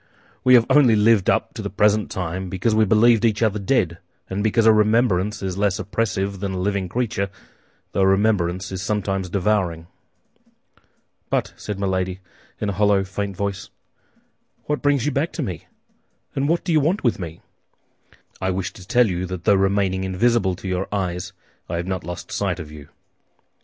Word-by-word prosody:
"We 130 0 +7
have 115 -2 +6
only 130 -7 +5
lived 105 -2 +4
up - - +1
to - - -6
the - - -4
present 105 0 +2
time 95 +1 -4
because 95 +5 0
we 110 0 +4
believed 115 +2 +4
each 110 -1 +2
other 105 -1 +1
dead, 95 -6 0 0.3
and 100 +2 -1
because 110 +1 +2
a 110 - +7
remembrance 105 -2 +2
is 95 0 -3
less 100 -2 +1
oppressive 100 -1 -2
than 100 0 -3
a - - -3
living 95 -1 -1
creature, 110 -3 -1 0.6
though - - 0
a 95 - +4
remembrance 95 -3 +1
is 95 -1 -4
sometimes 95 -2 -2
devouring." 90 -4 0 1.4
"But," - - -1
said 105 -2 -6
Milady, 95 -1 -1 0.4
in 105 - -1
a - - -1
hollow, 100 0 +3
faint 100 0 -4
voice, 100 -1 -3 1.0
"what 150 0 -2
brings 145 -4 +2
you 150 - +1
back 145 +5 -1
to 160 - -3
me, 90 - -6 0.7
and 140 +2 0
what 170 +1 +1
do - - -2
you 155 - +4
want 165 +8 0
with 120 -5 +1
me?" 85 -2 -7 1.0
"I 95 - 0
wish 95 0 -2
to 95 -2 -13
tell 125 +3 +4
you 90 -1 -2
that 90 -2 -6
though 100 - +4
remaining 95 -1 +1
invisible 95 0 +1
to 90 - -8
your 95 +1 -2
eyes, 90 -2 -2 0.4
I 85 - -2
have 85 +1 -2
not 95 -1 -3
lost 90 +2 -7
sight - - -1
of 75 -1 -8
you." 75 -1 -12
100 Hz, 185 wpm, -22 LUFS, 95-110 Hz, 1.4 s, We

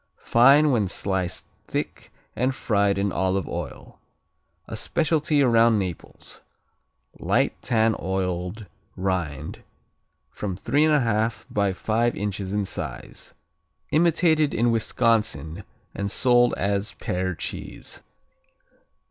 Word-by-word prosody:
Fine 140 +5 +5
when 110 -6 +2
sliced 95 -1 -2 0.2
thick - - -5 0.2
and 130 +2 0
fried 100 -5 +1
in 100 0 0
olive 95 -1 0
oil. - - -7 0.7
A - - -6
specialty 150 +4 +1
around 115 -2 +5
Naples. 90 -4 -6 0.8
Light - - +1
tan 110 -1 +2
oiled 95 +2 -3 0.3
rind, 90 -7 -3 0.8
about 95 -3 -3
3 145 +9 +2
1/2 115 -7 +1
by 100 -1 +1
five 115 +5 0
inches 100 -1 -3
in 105 0 0
size. 65 -8 -6 0.6
Imitated 160 -2 +3
in 120 +1 +2
Wisconsin 110 -7 0 0.3
and 100 0 -3
sold 120 +2 +3
as 100 0 -1
Pear 95 0 -2
cheese. - - -7
105 Hz, 105 wpm, -24 LUFS, 95-120 Hz, 0.8 s, Fine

